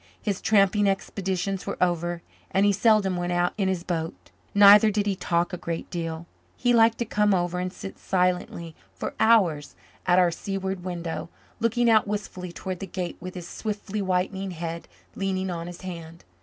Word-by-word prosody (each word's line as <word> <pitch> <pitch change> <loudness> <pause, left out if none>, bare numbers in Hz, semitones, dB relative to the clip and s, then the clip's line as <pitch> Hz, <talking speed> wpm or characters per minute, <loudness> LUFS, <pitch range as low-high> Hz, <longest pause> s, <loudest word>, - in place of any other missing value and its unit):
His 200 -3 -2
tramping 205 -1 +4
expeditions 195 -1 -2
were - - -3
over 175 -1 0 0.3
and 195 +1 +2
he 205 - +5
seldom 200 -3 +3
went 175 0 -1
out 175 0 +1
in 195 -3 0
his 185 -2 -1
boat. 165 -2 -4 0.2
Neither 205 +1 +8
did 205 0 0
he 200 -2 0
talk 175 -1 0
a - - -2
great 165 -1 -5
deal. 165 -1 -4 0.3
He 245 -1 +2
liked 230 -1 +5
to 235 - -1
come 210 -2 +2
over 175 0 -1
and 180 0 -2
sit 195 - -9
silently 180 -3 -1 0.2
for - - -4
hours 175 - +3 0.3
at 180 - +5
our 180 -2 +5
seaward 190 +1 -4
window, 170 -2 -4 0.3
looking 230 +1 +2
out 220 -2 +5
wistfully 195 -3 -4
toward 185 +1 -5
the 195 - -5
Gate 180 -1 -4
with 180 +1 -8
his 175 -2 -7
swiftly 210 0 -4
whitening 190 +1 -1
head 170 -1 -5 0.3
leaning 190 -1 -2
on 170 -1 -4
his 175 0 -9
hand. 170 -3 -8
185 Hz, 180 wpm, -26 LUFS, 175-200 Hz, 0.3 s, Neither